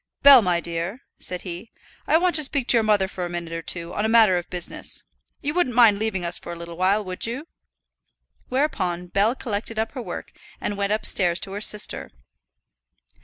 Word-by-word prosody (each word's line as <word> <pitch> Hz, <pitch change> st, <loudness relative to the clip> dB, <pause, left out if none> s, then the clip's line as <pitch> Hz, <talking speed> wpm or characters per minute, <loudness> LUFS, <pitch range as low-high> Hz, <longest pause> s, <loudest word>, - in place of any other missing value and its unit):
"Bell, 280 Hz, -3 st, +10 dB
my 180 Hz, -4 st, +1 dB
dear," 170 Hz, +8 st, -4 dB, 0.2 s
said 180 Hz, -1 st, -5 dB
he, 180 Hz, +4 st, -8 dB, 0.4 s
"I 315 Hz, -, +5 dB
want 355 Hz, +1 st, +1 dB
to 305 Hz, -, +3 dB
speak 275 Hz, -2 st, -1 dB
to -, -, +7 dB
your 230 Hz, -, +4 dB
mother 210 Hz, -3 st, +2 dB
for 185 Hz, -1 st, -6 dB
a 175 Hz, -, -3 dB
minute 170 Hz, -1 st, -5 dB
or 165 Hz, -, -4 dB
two 170 Hz, +1 st, -3 dB
on 210 Hz, -, -2 dB
a 220 Hz, -, +1 dB
matter 220 Hz, -5 st, +5 dB
of 175 Hz, -1 st, -3 dB
business. 175 Hz, -1 st, -4 dB, 0.4 s
You 290 Hz, +1 st, -1 dB
wouldn't 310 Hz, -9 st, 0 dB
mind 225 Hz, -4 st, +6 dB
leaving 210 Hz, -5 st, -2 dB
us 170 Hz, +1 st, -3 dB
for -, -, -8 dB
a -, -, -5 dB
little 170 Hz, 0 st, -9 dB
while, 190 Hz, +4 st, +2 dB
would 185 Hz, +2 st, -2 dB
you?" 265 Hz, +7 st, -5 dB, 1.0 s
Whereupon 190 Hz, -, -1 dB
Bell 205 Hz, +6 st, +2 dB
collected 220 Hz, -2 st, -4 dB
up 220 Hz, +1 st, -1 dB
her 260 Hz, -, -6 dB
work -, -, -7 dB, 0.3 s
and 205 Hz, -, -3 dB
went 200 Hz, 0 st, -1 dB
upstairs 185 Hz, -4 st, +1 dB
to 195 Hz, -, -2 dB
her 205 Hz, +1 st, -5 dB
sister. 210 Hz, -1 st, +1 dB
205 Hz, 205 wpm, -23 LUFS, 175-235 Hz, 1.0 s, Bell